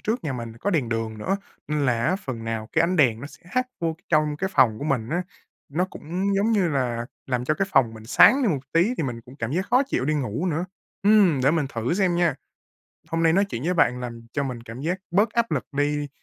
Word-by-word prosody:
trước 220 -2 -2
nhà 145 - -1
mình 115 -3 -5
có 205 - 0
đèn 145 -10 +1
đường 115 -1 -3
nữa, 190 - 0 0.3
nên 150 -2 0
là 120 -1 +1
á, 185 - +2
phần 130 - -6
nào 110 -1 -3
cái 160 - +3
ánh 175 +2 +1
đèn 120 -7 +3
nó 140 - -6
sẽ - - -16
hắt 255 +3 +1
vô 165 -1 0
c 160 - -13
trong 150 -2 +2
cái 190 +4 -2
phòng 120 -8 +4
của 145 - -5
mình 125 -6 -1
á. 175 +4 0 0.5
Nó 165 +6 0
cũng, 185 +3 -3
giống 210 +4 +2
như 195 -5 +2
là, 125 -5 -1 0.2
làm 125 -2 -1
cho 155 - +1
cái 195 +3 -1
phòng 130 -7 +3
mình 110 0 -11
sáng 265 - +6
đi 235 - +3
một 145 -7 0
tí 175 +9 +3
thì - - -1
mình 120 -4 -3
cũng 125 +4 -15
cảm 115 -1 -3
giác 185 +5 -1
khó 255 +2 +5
chịu 200 - -1
đi 155 +3 +1
ngủ 140 - -2
nữa. 165 0 -1 0.4
Ừm, 200 -8 +5
để 135 - +5
mình 155 -3 +1
thử 115 +7 -1
xem 185 -2 +2
nha. 170 -5 +2 0.8
Hôm 165 0 0
nay 165 - +4
nói 195 +4 +4
chuyện 135 -11 -5
với 180 +2 +1
bạn 125 -6 +2
làm 115 -2 -7
cho 140 - -1
mình 125 -4 -4
cảm 115 +2 -9
giác 175 +6 -1
bớt 205 +5 +3
áp 235 0 0
lực - - -1
đi, 145 0 0
150 Hz, 265 wpm, -24 LUFS, 125-185 Hz, 0.8 s, sáng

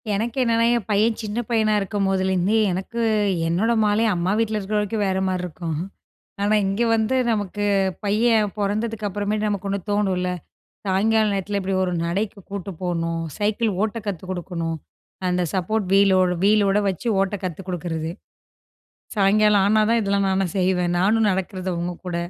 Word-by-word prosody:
எனக்கு 225 +5 -2
என்னன்னா, 230 -1 +2
என் 235 -5 -2
பையன் 215 +2 +2
சின்ன 215 +1 -3
பையனா 220 -2 +2
இருக்கும்போதேலேருந்தே 195 0 +1
எனக்கு 190 +6 -3 0.5
என்னோட 185 +8 +1
மாலை, 210 +2 +2
அம்மா 175 +1 0
வீட்ல 220 -1 0
இருக்கிற 210 +1 -2
வரைக்கும் 210 +1 -1
வேற 190 0 0
மாரி 185 -1 -1
இருக்கும். 165 -1 -5 0.7
ஆனா, 205 +1 +3
இங்க 195 +4 0
வந்து 225 +3 +1 0.2
நமக்கு 205 -1 -2 0.4
பையன் 215 0 +2
பொறந்ததுக்கு 210 +1 -1
அப்புறமேட்டு, 210 +2 -1
நமக்கு 200 -1 -3
ஒண்ணு 200 0 -1
தோணுல்ல, 190 -3 0 0.6
சாயங்கால 215 +3 +2
நேரத்தில 200 +1 -2
இப்டி 190 +1 -2
ஒரு 180 -1 -1
நடைக்கு 200 +5 -2
கூட்டு 200 -1 -5
போணும், 165 -2 -1 0.2
சைக்கிள் 215 +2 0
ஓட்ட 220 +1 -2
கத்து 190 -5 -3
குடுக்கணும். 170 -2 -3 0.5
அந்த 180 0 +1
சப்போர்ட் 200 +2 -1
வீலோட் 190 -2 +4
வீலோட 205 -1 +4
வச்சு 190 +5 -4
ஓட்ட 195 +1 0
கத்து 180 0 -4
குடுக்குறது. 165 -2 -3 1.1
சாயங்காலம் 205 0 +4
ஆனா 215 +2 +4
தான், 230 0 +3
இதெல்லாம் 200 -1 +1
நானும் 190 -3 0
செய்வேன். 180 -1 +1
நானும் 215 +4 +3
நடக்கிறது, 185 0 -3
அவுங்க 175 +1 -3
கூட. 175 -1 -2
200 Hz, 150 wpm, -22 LUFS, 185-215 Hz, 1.1 s, வீலோட்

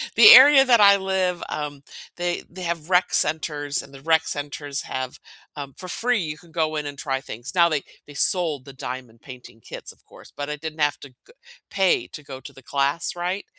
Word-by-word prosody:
the 220 -1 +10
area 270 +2 +9
that 240 -3 +5
I 200 -1 +7
live, 190 -2 -1
um, 145 -2 -5 0.4
they 175 0 -2
they 185 +2 -11
have 170 -1 -4
rec 180 0 +3
centers, 145 -2 -1
and 140 - -15
the 135 - -12
rec 160 +1 +2
centers 145 0 -5
have, 130 -1 -5 0.4
um 140 -2 -8
for 185 - -8
free, 240 +5 0
you 155 -4 -4
can 170 0 -19
go 155 -1 -1
in 150 -1 -3
and 145 -1 -7
try 135 -4 -3
things. 120 - -8
Now, 170 -1 +5
they 150 -3 -1 0.2
they 145 - -12
sold 155 -3 +2
the 140 - -11
diamond 125 -3 -8
painting 125 -3 -13
kits, - - -8
of - - -25
course, - - -16
but 145 0 -5
I 150 - -3
didn't 160 +1 -8
have 145 -1 +1
to 140 - -11 0.2
go - - -20 0.4
pay 190 -2 +1
to 150 - -11
go 135 -2 -9
to - - -12
the 135 - -16
class, 140 +7 -1
right, 180 +3 -3
155 Hz, 215 wpm, -23 LUFS, 140-180 Hz, 0.4 s, the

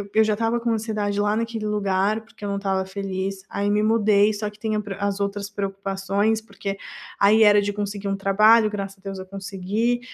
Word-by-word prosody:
eu 220 - +6
já 215 0 +1
estava 225 +2 0
com 235 0 -1
ansiedade 215 -2 -1
lá 205 +1 +1
naquele 225 -1 -2
lugar, 205 +1 +1
porque 215 -1 -12
eu - - -2
não 200 - -1
estava 190 -1 -1
feliz. 190 0 -4
Aí 200 0 -1
me 210 +1 +2
mudei, 215 -1 +4
só 210 0 -3
que 210 - -17
tem 220 0 -2
a - - +1
pre 200 -1 -6
as 200 0 -1
outras 200 0 -2
preocupações, 195 +1 -1
porque 200 -2 -6 0.4
aí 215 +2 +6
era 205 -1 +6
de 205 0 -2
conseguir 205 0 -4
um 195 - 0
trabalho, 215 +3 +5
graças 200 -1 -5
a - - -25
Deus 195 -1 -6
eu 185 - -7
consegui, 200 +5 -2
205 Hz, 215 wpm, -23 LUFS, 195-215 Hz, 0.4 s, eu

